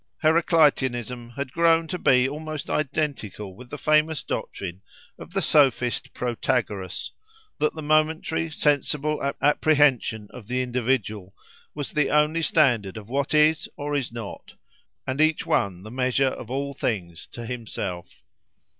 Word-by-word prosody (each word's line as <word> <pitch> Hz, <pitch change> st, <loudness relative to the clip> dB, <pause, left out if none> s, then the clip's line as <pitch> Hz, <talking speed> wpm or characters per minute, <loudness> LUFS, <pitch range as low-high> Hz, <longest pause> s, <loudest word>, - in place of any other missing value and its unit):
Heracliteanism 130 Hz, -, +2 dB
had 140 Hz, -2 st, -4 dB
grown 165 Hz, +1 st, +3 dB
to 180 Hz, -, -3 dB
be 130 Hz, -3 st, +4 dB
almost 155 Hz, +1 st, -5 dB
identical 130 Hz, -, -2 dB
with 125 Hz, +4 st, -13 dB
the 145 Hz, -, -6 dB
famous 155 Hz, +1 st, +2 dB
doctrine 95 Hz, -1 st, -5 dB, 0.4 s
of -, -, -10 dB
the 195 Hz, +1 st, -1 dB
sophist 130 Hz, -5 st, +3 dB
Protagoras, 115 Hz, -6 st, -2 dB, 0.5 s
that 150 Hz, -, +1 dB
the 155 Hz, -, -6 dB
momentary, 160 Hz, +2 st, +1 dB
sensible 150 Hz, 0 st, +1 dB, 0.2 s
apprehension 145 Hz, -8 st, +3 dB
of 120 Hz, -5 st, -11 dB
the 125 Hz, +1 st, 0 dB
individual 120 Hz, -6 st, -2 dB, 0.4 s
was 145 Hz, -2 st, -4 dB
the 150 Hz, -2 st, +1 dB
only 150 Hz, +2 st, +2 dB
standard 125 Hz, -, +2 dB
of 105 Hz, 0 st, -10 dB
what 140 Hz, +3 st, 0 dB
is 150 Hz, 0 st, +3 dB
or 145 Hz, 0 st, -3 dB
is 135 Hz, -5 st, -1 dB
not, 115 Hz, -4 st, -8 dB, 0.5 s
and 130 Hz, +3 st, -1 dB
each 155 Hz, 0 st, +2 dB
one 95 Hz, -2 st, 0 dB
the 110 Hz, -, -9 dB
measure 130 Hz, +1 st, +2 dB
of 120 Hz, -, -8 dB
all 140 Hz, +2 st, -2 dB
things 90 Hz, -11 st, -3 dB
to 120 Hz, -, -8 dB
himself. 105 Hz, -7 st, -5 dB
135 Hz, 135 wpm, -25 LUFS, 115-150 Hz, 0.5 s, be